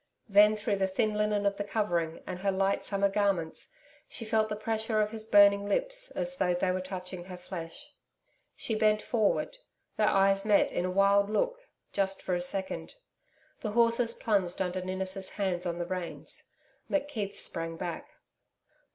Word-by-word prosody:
Then 210 +1 +6
through 210 -1 -1
the 190 0 +1
thin 215 +3 0
linen 210 -1 0
of 200 0 +1
the 205 - -2
covering, 175 -6 -1
and 180 -1 -5
her 195 +1 +1
light 195 +1 +1
summer 200 0 +1
garments, 195 -5 -1 0.4
she 230 - -5
felt 220 0 +1
the 210 - -2
pressure 220 0 -1
of 210 0 +1
his 220 -1 -3
burning 200 -1 +6
lips - - +1
as 270 +1 -3
though 180 -5 +2
they 185 +1 +1
were 185 0 -1
touching 185 -1 -5
her 180 -1 -8
flesh. 180 - -8 0.6
She 225 - -3
bent 215 -1 +2
forward. 235 - 0 0.4
Their 210 - +3
eyes 195 0 +3
met 210 -1 +3
in 175 - -1
a - - -1
wild 200 +2 +3
look, - - -1 0.3
just 195 -1 0
for 185 - -1
a 175 - 0
second. 190 - -2 0.6
The 215 -2 -4
horses 230 0 +3
plunged 195 -5 0
under 185 0 -1
Ninnis' 190 +1 -3
hands 185 -3 -2
on 170 0 -2
the 175 - -2
reins. 180 -1 -6 0.4
McKeith 275 -9 -2
sprang 165 0 -3
back. 175 -2 -5
200 Hz, 170 wpm, -30 LUFS, 185-215 Hz, 0.6 s, Then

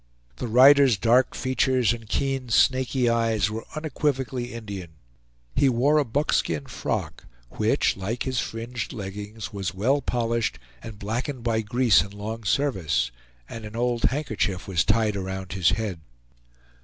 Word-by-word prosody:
The - - -4
rider's 130 0 +6
dark 120 +5 +3
features 130 -3 +1
and 115 -2 -9
keen 135 -2 -1
snaky 130 +1 +3
eyes 115 -3 +1
were 110 +1 -6
unequivocally 135 -5 -2
Indian. 100 -7 -7 0.6
He 140 0 +4
wore 135 +5 +3
a - - +3
buckskin 110 - 0
frock, - - -4 0.3
which, - - +1
like 105 +6 -3
his 130 -2 -1
fringed 115 0 -4
leggings, 105 +1 -7
was 95 -2 -3
well 130 +9 +2
polished 115 -2 -1 0.2
and 110 -2 -9
blackened 120 +5 -4
by 115 -2 +1
grease 120 +1 +4
and 100 0 -7
long 110 +2 -6
service; 95 - +1 0.4
and 115 - -8
an 105 +1 -8
old 120 0 0
handkerchief 110 -9 -1
was 90 -2 +2
tied 110 -2 +2
around 95 -1 -5
his 95 -3 +3
head. 105 -6 -2
115 Hz, 145 wpm, -25 LUFS, 105-130 Hz, 0.6 s, rider's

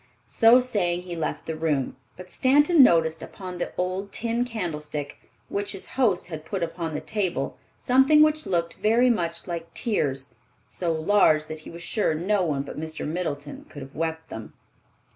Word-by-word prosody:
So 230 +2 +6
saying, 180 -8 0
he 175 -1 -6
left 160 -2 -3
the 160 - -3
room; 155 -4 -1 0.2
but 185 0 -11
Stanton 290 +5 +5
noticed 165 -8 +4
upon 180 -2 -8
the - - -2
old 185 +2 -2
tin 235 +1 -1
candlestick 150 -10 -4 0.3
which 200 +1 -2
his 195 - -7
host 225 -9 +1
had 155 -2 -6
put 185 +2 -3
upon 165 -1 -3
the - - -3
table 200 -5 -2 0.2
something 265 +4 +5
which 310 0 +1
looked 170 -2 0
very 235 +4 +4
much 170 -6 -2
like 170 -2 -5
tears, 140 - -1 0.3
so 175 -2 -2
large 160 -2 +3
that 155 0 -7
he 155 - -11
was 170 0 -9
sure 200 -4 0
no 190 +4 +1
one 145 -5 -1
but 140 - -7
Mr. 160 0 -4
Middleton 150 -3 -4
could 145 -2 -9
have 135 - -12
wept 160 0 -3
them. 110 -1 -8
175 Hz, 175 wpm, -25 LUFS, 160-215 Hz, 0.3 s, So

